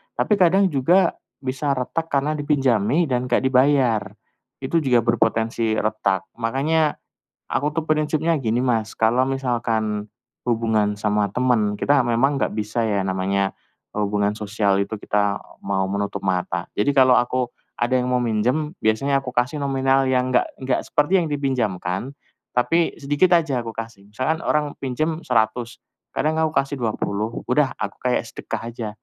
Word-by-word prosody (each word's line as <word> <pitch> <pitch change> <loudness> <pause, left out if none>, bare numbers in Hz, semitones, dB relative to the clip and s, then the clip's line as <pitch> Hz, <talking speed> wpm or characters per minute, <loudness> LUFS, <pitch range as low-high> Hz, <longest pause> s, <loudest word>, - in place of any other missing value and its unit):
Tapi 210 - +1
kadang 190 +2 +4
juga 165 +8 +3 0.3
bisa 135 +2 -1
retak 150 +6 -2
karena 140 +2 +1
dipinjami 135 - +2
dan 125 -1 0
enggak 125 - +2
dibayar, 130 -3 +3 0.6
itu 130 +6 0
juga 125 -5 +3
berpotensi 115 -1 +1
retak. 105 -3 -1
Makanya 145 +7 +1 0.6
aku 145 - 0
tuh 165 - -1
prinsipnya 155 +2 +1
gini, 120 -2 0
Mas, 115 -4 0
kalau 120 +3 +3
misalkan 115 -5 -1 0.4
hubungan 110 -3 +1
sama 105 0 0
temen, 120 -5 +1
kita 145 +6 +3
memang 125 +5 +2
enggak - - -1
bisa 110 +2 -1
ya 100 -2 0
namanya 95 +1 0 0.4
hubungan 105 0 0
sosial 105 -2 0
itu 100 +2 -2
kita 100 -1 0 0.2
mau 95 -1 -1
menutup 100 +1 -3
mata. 90 -1 -1
Jadi 140 +7 0
kalau 130 -1 +6
aku 125 +1 0 0.2
ada 120 +1 -1
yang 125 - -2
mau 125 0 +1
minjem, 125 +7 0
biasanya 135 +6 +1
aku 135 - -9
kasih 125 +5 0
nominal 135 -1 +2
yang 130 0 +1
enggak - - +3
enggak 130 0 -1
seperti 180 +6 +2
yang 165 - -2
dipinjamkan. 125 -6 -2 0.4
Tapi 165 +7 +2
sedikit 150 +5 +3
aja 145 -7 0
aku 115 -1 -6
kasih. 115 -3 -8
Misalkan 130 +9 -1
orang 150 -3 0
pinjam 155 +5 -2
Rp100.000 115 0 0 0.4
kadang 155 +2 0
aku 160 -1 +1
kasih 140 -1 0
Rp20.000 110 -1 -2
udah - - +2
aku - - -4
kayak - - +1
sedekah - - -6
aja. 115 -2 -5
125 Hz, 150 wpm, -22 LUFS, 110-140 Hz, 0.6 s, kalau